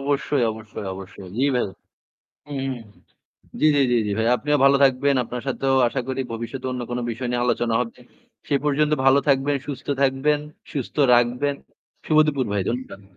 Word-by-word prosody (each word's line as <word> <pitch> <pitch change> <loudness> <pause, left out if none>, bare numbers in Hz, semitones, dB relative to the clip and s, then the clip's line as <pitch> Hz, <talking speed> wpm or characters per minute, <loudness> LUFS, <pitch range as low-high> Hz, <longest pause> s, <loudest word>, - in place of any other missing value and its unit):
অবশ্যই, 140 -1 0
অবশ্যই 110 -2 -8
অবশ্যই। 95 0 -10
জি 135 +3 +2
ভাই। 125 - +1 0.9
উহু, 135 -1 -2 0.9
জি, 155 - +4
জি, 140 - +4
জি, 120 - +4
জি, 105 - -2
ভাই। 110 - +1
আপনিও 150 +3 0
ভালো 140 - +6
থাকবেন। 135 +1 +3
আপনার 125 +1 -6
সাথেও 135 0 +1
আশা 130 +2 -2
করি 130 0 -2
ভবিষ্যতে 120 +3 -5
অন্য 125 -1 -4
কোন 120 - -1
বিষয় 120 +2 -4
নিয়ে 120 0 0
আলোচনা 120 -1 0
হবে। 120 -2 -4 0.5
সে 145 - +1
পর্যন্ত 150 +1 +2
ভালো 135 +1 +6
থাকবেন, 140 +1 +2
সুস্থ 140 -1 -6
থাকবেন, 140 +2 +2 0.3
সুস্থ 140 -6 -5 0.2
রাখবেন। 125 +4 +2 0.5
শুভ 155 - +2
দুপুর 140 -4 0
ভাই 100 -2 0
ধন্যবাদ। 120 -4 -4
130 Hz, 170 wpm, -23 LUFS, 120-140 Hz, 0.9 s, ভালো